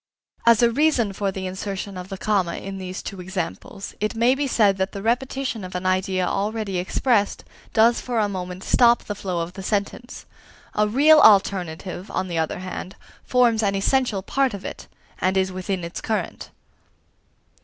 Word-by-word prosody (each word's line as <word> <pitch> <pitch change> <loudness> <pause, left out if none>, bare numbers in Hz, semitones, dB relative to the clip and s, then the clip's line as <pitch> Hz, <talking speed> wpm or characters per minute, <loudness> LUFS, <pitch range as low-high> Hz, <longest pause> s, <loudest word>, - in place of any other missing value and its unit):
As 235 0 +6
a 235 - +5
reason 255 -6 +2
for 195 0 -1
the 190 0 -5
insertion 195 +1 -5
of 180 +1 -7
the 195 - -5
comma 190 -4 0
in 195 0 -6
these 185 0 -6
two 195 -2 -6
examples, 180 - -5
it 215 +3 -1
may 235 +3 +4
be 280 +1 -1
said 205 -6 +3
that 190 0 -1
the 200 - -5
repetition 250 -1 -1
of 185 0 -7
an 180 +1 -3
idea 185 0 +1
already 205 -1 -1
expressed 205 +3 +1 0.3
does 230 +2 +4
for 245 -2 -3
a 215 -2 +3
moment 185 -1 -5
stop 240 -1 +4
the 205 - -4
flow 185 -4 -3
of 170 +2 -5
the 195 - -8
sentence. 205 +5 -3 0.5
A 210 0 +2
real 295 +8 +6
alternative, 190 - +3
on 185 - -2
the 170 -2 -1
other 160 - -1
hand, 185 0 -6 0.3
forms 240 -3 +3
an 200 -2 +1
essential 210 -1 +1
part 270 0 0
of 195 - -9
it, - - -7 0.3
and 190 +1 +1
is 190 0 +1
within 185 0 -3
its 170 +1 -6
current. 220 -1 -3
195 Hz, 180 wpm, -23 LUFS, 185-230 Hz, 0.5 s, As